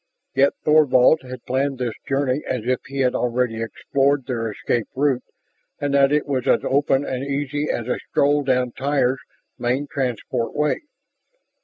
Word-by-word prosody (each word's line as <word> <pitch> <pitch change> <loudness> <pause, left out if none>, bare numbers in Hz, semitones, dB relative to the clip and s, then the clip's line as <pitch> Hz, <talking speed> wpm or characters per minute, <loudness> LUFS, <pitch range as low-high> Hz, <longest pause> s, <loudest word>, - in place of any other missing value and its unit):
Yet 135 +1 +4
Thorvald 150 -1 +5
had 130 -1 -9
planned 135 +1 0
this 125 -3 -2 0.2
journey 135 0 +1
as 125 - -1
if 130 +1 +1
he 140 0 -3
had 125 -1 +2
already 120 -2 0
explored 135 +4 0
their 115 -3 -2
escape 110 +2 -2
route 135 -2 +1 0.6
and 145 -1 -1
that 140 0 +5
it 150 0 +2
was 130 -3 -2
as - - +4
open 140 0 +2
and 130 0 -3
easy 145 +1 -2
as 115 - -2
a 125 - -1
stroll 145 +1 +3
down 125 -2 +1
Tyr's 135 -1 0 0.4
main 125 +4 0
transport 125 -4 -3
way. 150 - +1
135 Hz, 160 wpm, -22 LUFS, 125-140 Hz, 0.6 s, Thorvald